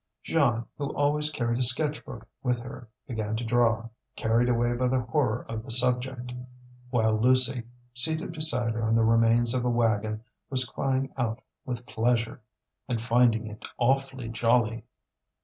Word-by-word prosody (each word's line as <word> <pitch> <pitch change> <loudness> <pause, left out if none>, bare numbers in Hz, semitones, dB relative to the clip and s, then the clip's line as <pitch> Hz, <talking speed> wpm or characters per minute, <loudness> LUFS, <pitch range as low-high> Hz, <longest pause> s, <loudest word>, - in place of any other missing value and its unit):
Jeanne, 120 -7 +1
who 140 0 -2
always 150 +1 +1
carried 120 -5 -2
a - - +2
sketch 145 +5 +4
book - - -10
with 125 -2 0
her, 120 -1 -10 0.2
began 110 -3 -3
to 115 - -3
draw, 115 -1 +1 0.3
carried 115 +2 +1
away 120 0 +1
by 125 +1 0
the 130 0 +1
horror 120 -2 -1
of 110 -1 -5
the 130 - -12
subject; 125 +1 -1 0.6
while 110 -3 +2
Lucie, 130 +2 +3 0.3
seated 160 +7 +2
beside 125 -8 +1
her 115 - -3
on 110 0 +1
the 115 - +3
remains 115 +1 +3
of 125 -1 -1
a 125 - +1
wagon, 110 -2 0 0.3
was 130 -1 +4
crying 135 +1 -2
out 115 -3 -1 0.3
with 125 -2 -5
pleasure, 115 -1 -1 0.5
and 120 -3 -1
finding 115 -1 +2
it 105 0 -9
awfully 135 -1 0
jolly. 115 0 +1
120 Hz, 160 wpm, -27 LUFS, 115-130 Hz, 0.6 s, sketch